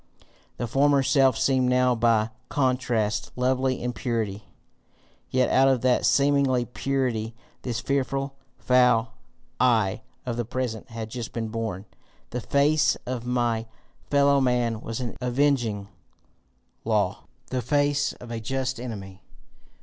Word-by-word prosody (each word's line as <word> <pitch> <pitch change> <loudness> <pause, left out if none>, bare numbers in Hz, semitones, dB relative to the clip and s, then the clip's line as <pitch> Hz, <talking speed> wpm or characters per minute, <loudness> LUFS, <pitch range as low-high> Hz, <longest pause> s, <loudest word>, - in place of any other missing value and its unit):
The 120 - -2
former 140 +3 +3
self 135 -3 +3
seemed 130 -2 +2
now 125 0 +3
by 115 -1 +2 0.2
contrast 125 -7 0
lovely 130 +1 +1
in 125 0 -2
purity, 110 -3 -3 0.8
yet 130 0 +2
out 135 +1 +5
of 130 -3 +2
that 125 -1 +3
seeming 140 0 +3 0.3
purity 120 -5 -1 0.3
this 120 -3 -3
fearful, 135 0 -1 0.2
foul 125 -2 +3 0.5
I 110 -6 +2 0.2
of 120 -2 -3
the 120 - 0
present 120 0 -4
had 115 -1 -6
just 120 -2 -6
been 115 -1 -3
born! 110 -4 -4 0.5
The 125 - -3
face 145 +5 +3
of 125 -1 -4
my 120 -2 0 0.4
fellow 140 -1 +4
man 120 -3 +1
was 115 +2 -5
an 120 -2 -4
avenging 125 -5 +1 1.0
law, 105 -3 0 0.3
the 130 -1 0
face 145 +2 +1
of 120 -1 -11
a 115 - -3
just 130 +2 -2
enemy. 100 -6 -7
125 Hz, 130 wpm, -25 LUFS, 115-135 Hz, 1.0 s, out